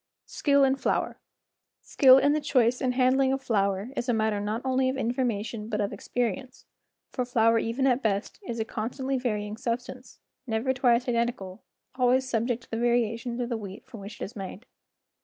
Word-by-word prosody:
Skill 280 -1 +2
in 270 0 +3
Flour - - -1 0.6
S - - -17
KILL 260 -2 +8
in 285 +2 +3
the 305 - 0
choice 250 -4 +2
and 250 -1 0
handling 260 +1 +3
of 270 - 0
flour 200 -2 0
is 245 - -3
a 240 - +3
matter 220 -1 0
not 210 +4 -3
only 260 0 +2
of 265 - -2
information 230 -3 -2
but 210 -2 -2
of 205 0 -1
experience, 250 +2 -3 0.5
for 255 - -1
flour 230 -2 +3
even 230 +4 -1
at 255 0 +2
best 205 -3 -2
is 235 - -5
a 220 - -1
con¬ 220 0 -3
stantly 265 0 -3
varying 210 -3 -2
substance, 245 +1 -5 0.3
never 230 +3 0
twice 250 -1 +2
identical, 235 -5 -2 0.3
always 255 0 +2
subject 235 0 -1
to - - -22
the 225 - -2
variations 235 0 0
of 245 -1 -2
the 235 - -1
wheat 200 -2 -9
from 255 -4 -11
which 200 +2 -9
it - - -4
is 205 - -7
made. 195 +3 -7
240 Hz, 195 wpm, -27 LUFS, 220-260 Hz, 0.6 s, KILL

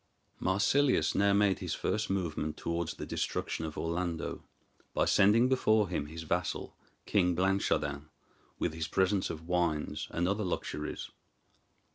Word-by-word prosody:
Marsilius 125 +9 +3
now 100 0 +3
made 100 -1 +3
his - - -3
first 110 0 -1
movement 85 -5 -2
towards 85 -1 -2
the - - -6
destruction 80 - -2
of 80 - -6
Orlando, 85 0 -2 0.5
by - - +3
sending 110 +5 +5
before 110 -6 +3
him 75 -5 -2
his 80 +2 -7
vassal, 80 - -2 0.3
King 90 -4 +2
Blanchardin, 80 -6 0 0.5
with - - -1
his 80 -1 -3
presents 95 +3 +1
of 80 0 -6
wines 85 -4 0
and 85 +1 0
other 100 +3 0
luxuries. 75 -4 -4
90 Hz, 135 wpm, -31 LUFS, 80-100 Hz, 0.5 s, sending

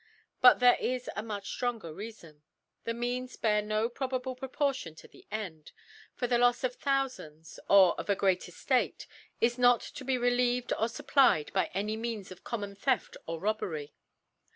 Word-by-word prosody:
But 250 - +8
there 245 0 +6
is 250 0 -2
a - - -2
much 210 -2 -6
ftronger 230 -10 -2
Reafon. 175 -6 -10 0.4
The 230 - -1
Means 245 +2 -3
bear 210 -2 +1
rio 215 +1 0
Proportion 260 - -3
to - - -14
the - - -19
End: 185 -8 -6 0.4
For 250 - -2
the 240 0 +2
Lcfs 245 +1 +3
of 250 -1 -2
Thoufands, 260 - -2
or 195 -3 +7
of - - -6
a 200 - +4
great 190 -2 +2
Eftate, - - -1 0.3
is 240 +1 +1
not 245 -1 +5
to 280 - -9
be 260 0 0
relieved 245 0 +1
or 225 - 0
fupplied 235 - +2
by - - +1
any 210 +3 -1
Mearrs 225 -4 -5
of 185 - -12
common 205 -4 -4
Theft 250 +6 -1
or 165 0 -4
Robbery. 170 -8 -3
230 Hz, 165 wpm, -30 LUFS, 200-250 Hz, 0.4 s, But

